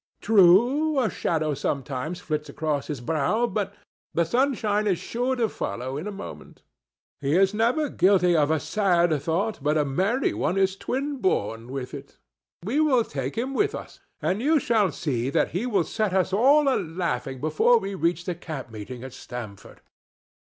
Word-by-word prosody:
True, 240 - +4
a 240 -4 +1
shadow 155 -3 -1
sometimes 140 +4 -3
flits 150 -3 -3
across 150 -1 -2
his 145 -5 -5
brow, 160 - +1
but 200 -3 -2 0.4
the 170 - +3
sunshine 220 - +1
is 190 -4 +2
sure 245 +7 -2
to 235 -3 +1
follow 130 - -4
in 155 +8 -4
a - - -3
moment. 200 - -10 0.6
He 140 +3 0
is 195 +1 +4
never 240 +8 +1
guilty 185 -7 +3
of 150 -2 +3
a 160 -1 +2
sad 175 -3 +2
thought 185 +9 -1
but 150 +2 +1
a 150 - +2
merry 195 - 0
one 180 - -1
is 190 0 +2
twin 275 +7 -3
born 115 - -1
with 130 -2 -5
it. 140 -1 -10 0.5
We 250 +9 0
will 275 -6 +4
take 135 -4 -5
him 255 +4 -2
with 415 +8 +1
us, - - -9 0.2
and 195 +4 0
you 305 +4 +3
shall 220 - +2
see 130 -5 -2
that - - +1
he 200 +8 -2
will 200 -7 +2
set 215 +1 -2
us 190 0 +1
all 280 +8 +5
a 270 - +3
laughing 165 -6 -3
before 155 - +3
we 195 -2 -4
reach 175 -2 -1
the 180 - -1
camp 155 -8 -7
meeting 115 +3 -8
at 130 -1 -8
Stamford." 115 -7 -9
185 Hz, 180 wpm, -25 LUFS, 150-225 Hz, 0.6 s, all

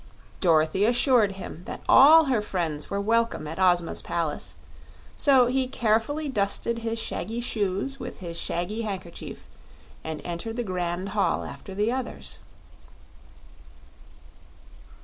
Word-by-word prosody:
Dorothy 165 +2 +3
assured 240 -3 +3
him 190 -3 -8
that - - -6
all 310 +4 +8
her 255 -6 +1
friends 165 -7 -3
were 200 - -1
welcome 230 -5 0
at 160 +4 -6
Ozma's 175 -2 +2
palace, 165 -3 -3 0.6
so 265 -3 +5
he 260 +1 0
carefully 245 +6 0
dusted 230 0 -1
his 230 0 -3
shaggy 225 0 -3
shoes 220 +3 -1
with - - -7
his 170 -3 -7
shaggy 175 +6 -2
handkerchief 190 -6 -6 0.6
and 160 -1 -5
entered 175 +6 -4
the 240 - -1
grand 180 -1 -3
hall 205 -1 0
after 190 - -9
the 210 +3 +1
others. 260 0 -5
205 Hz, 125 wpm, -26 LUFS, 175-240 Hz, 0.6 s, all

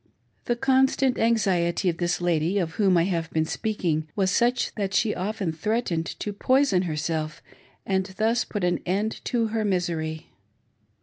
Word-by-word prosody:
The 240 - +1
constant 265 0 +2
anxiety 195 -6 +1
of 170 -2 +1
this 175 0 0
lady, 175 +1 +1
of 170 -4 0
whom 190 -1 +3
I 165 - +4
have 170 -3 -1
been, 160 0 0
speaking, 165 -6 -2
was 190 -2 +1
such 245 +1 +1
that 195 -2 -2
she 220 - +2
often 195 -1 -2
threatened 170 -1 -1
to 205 - -3
poison 255 -3 +3
herself 155 0 -3 0.4
and 190 -1 0
thus 230 +3 +2
put 205 -4 -4
an 175 0 +1
end 205 +5 -2
to 230 -3 0
her 220 0 -1
misery. 165 -5 -2
190 Hz, 160 wpm, -25 LUFS, 170-220 Hz, 0.4 s, I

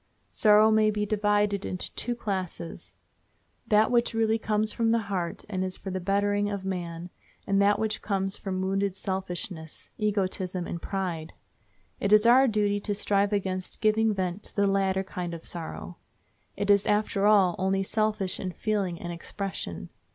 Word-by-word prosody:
Sorrow 215 0 +5
may 215 0 +4
be 210 0 -1
divided 205 -1 +1
into 185 - -4
two 240 0 -1
classes—that 205 +2 -3
which 235 -1 +2
really 225 0 +2
comes 215 0 0
from 230 -1 +1
the 230 - +4 0.2
heart 175 -3 -3
and 185 -3 -2
is 185 0 -4
for 190 - -6
the 185 - -2
bettering 205 +2 +1
of 200 -2 -4
man, 175 -2 -4 0.3
and 195 0 +2
that 205 +1 +4
which 215 0 -1
comes 195 -1 -1
from 190 -1 -3
wounded 195 0 0
selfishness, 180 -4 -5
egotism, 190 -3 -1
and 170 - -5
pride. 175 -5 -3 0.7
It 200 - -1
is 215 +1 +6
our 255 +3 +7
duty 205 -2 +1
to 205 0 -2
strive 200 0 +1
against 185 -2 -2
giving 220 0 +3
vent 185 -1 -2
to - - -8
the 200 - +3
latter 195 -1 +1
kind 180 -3 -5
of 165 - -11
sorrow. 85 - -7 0.6
It 205 0 +2
is, 200 0 +4
after 205 -1 +2
all, 195 -4 +5
only 190 +1 +1
selfish 215 -2 0
in 185 -2 -4
feeling 195 -6 -1
and 175 0 -5
expression. 170 - -5
200 Hz, 165 wpm, -27 LUFS, 185-210 Hz, 0.7 s, our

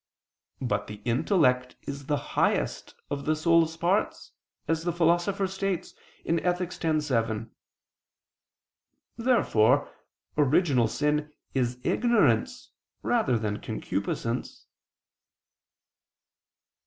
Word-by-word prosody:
But 105 -5 -1
the 105 -1 -8
intellect 125 - +2
is 140 -1 -7
the 145 - +1 0.2
highest - - 0 0.2
of 140 -1 -3
the 155 - +2
soul's 165 0 +3
parts, 180 +5 0 0.4
as 160 0 0
the 175 - 0
Philosopher 175 +4 +2
states 190 -1 -3 0.3
(Ethic. 180 +2 0
x, 155 -2 +1
7). 115 -4 -1 1.6
Therefore 145 - +2 0.4
original 145 -4 +3
sin 150 +4 0 0.2
is 125 -2 0
ignorance 205 - +2 0.3
rather 125 -2 +2
than 105 -2 -3
concupiscence. - - -3
150 Hz, 90 wpm, -27 LUFS, 125-175 Hz, 1.6 s, soul's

